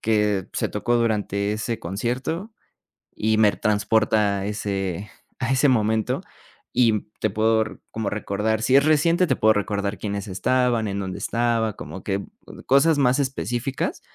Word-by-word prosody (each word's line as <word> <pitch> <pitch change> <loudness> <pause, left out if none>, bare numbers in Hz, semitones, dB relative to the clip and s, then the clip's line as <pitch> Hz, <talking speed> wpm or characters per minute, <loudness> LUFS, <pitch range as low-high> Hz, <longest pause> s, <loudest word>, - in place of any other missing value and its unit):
que 105 -3 +1
se - - -1
tocó 120 +3 0
durante 105 -3 0
ese 110 +2 -3
concierto, 125 - -3 0.6
y 110 0 +1
me 105 -2 +5
transporta 105 -1 +1
a 95 - -4
ese 100 -2 -3 0.3
a 125 0 -1
ese 135 +2 +4
momento. 110 -3 +1 0.5
Y 115 -4 +2
te 110 - +1
puedo 110 +2 +2
r 110 - -9
como 110 -2 -2
recordar 105 +1 -1
Si 130 +3 +3
es 140 - +6
reciente, 165 +4 +3
te - - +2
puedo 110 0 +4
recordar 105 0 -2
quiénes 100 0 -4
estaban, 120 +3 +1
en 100 0 -3
dónde 95 -1 -4
estaba, 115 -3 0
como 90 +5 -8
que 100 0 -2 0.4
cosas 145 +4 +4
más 125 -1 +3
específicas. 130 -1 -2
110 Hz, 155 wpm, -23 LUFS, 100-120 Hz, 0.6 s, es